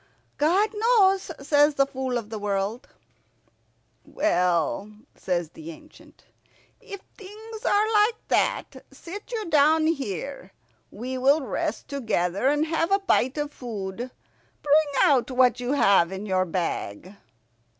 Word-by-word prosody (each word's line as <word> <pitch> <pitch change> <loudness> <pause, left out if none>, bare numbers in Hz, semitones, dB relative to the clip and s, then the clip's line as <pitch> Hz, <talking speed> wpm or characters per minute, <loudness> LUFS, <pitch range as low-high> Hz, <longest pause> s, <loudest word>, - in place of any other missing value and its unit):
"God 370 +8 +2
knows," 420 -4 +3
says 290 +1 +3
the 275 - +3
Fool 265 -2 -3
of 220 -2 -7
the 220 - -4
World. 205 +3 -2 1.2
"Well," 180 - 0 0.2
says 175 -3 -2
the 160 0 -10
ancient, 300 - -15 0.5
"if 400 -1 -10 0.2
things 430 +3 -10
are 425 +2 +2
like 425 +2 +4
that, - - 0
sit 405 +7 -10
you 445 -3 -3
down 310 0 +4
here. 270 - -3 0.4
We 255 +4 -6
will 280 +4 +4
rest - - -3
together 220 -6 -1
and 295 +2 +2
have 330 +2 -1
a 395 - +5
bite 310 -9 +1
of 295 0 -3
food. 225 0 -6 0.5
Bring 295 0 +3
out 270 -3 +3
what 250 -1 +3
you 250 +2 -2
have 195 -10 +4
in 190 +2 -6
your 185 -2 +1
bag." 170 - -4
275 Hz, 130 wpm, -25 LUFS, 205-330 Hz, 1.2 s, a